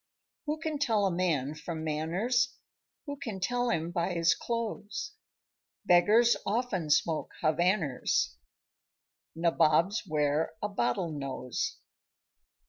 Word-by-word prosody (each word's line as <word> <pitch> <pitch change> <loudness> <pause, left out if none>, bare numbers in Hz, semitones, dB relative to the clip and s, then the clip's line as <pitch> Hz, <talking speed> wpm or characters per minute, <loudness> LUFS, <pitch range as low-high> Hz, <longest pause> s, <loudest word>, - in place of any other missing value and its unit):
Who 300 +1 0
can 310 -2 -3
tell 220 -7 +2
a 190 - +2
man 160 -6 0
from 160 0 -6
manners? 190 - 0 0.5
Who 285 -1 -5
can 225 -8 -5
tell 245 +6 0
him 170 -5 -1
by 175 +1 -1
his 165 -1 +3
close? 230 - -4 0.7
Beggars 215 +7 +5
often 205 -7 -1
smoke 155 +1 +2
Havanners; 155 - +1 1.0
Nabobs 170 +3 +3
wear 150 +1 +1
a 210 - -2
bottle 160 - 0
nose. 135 -4 -3
175 Hz, 110 wpm, -30 LUFS, 155-230 Hz, 1.0 s, Beggars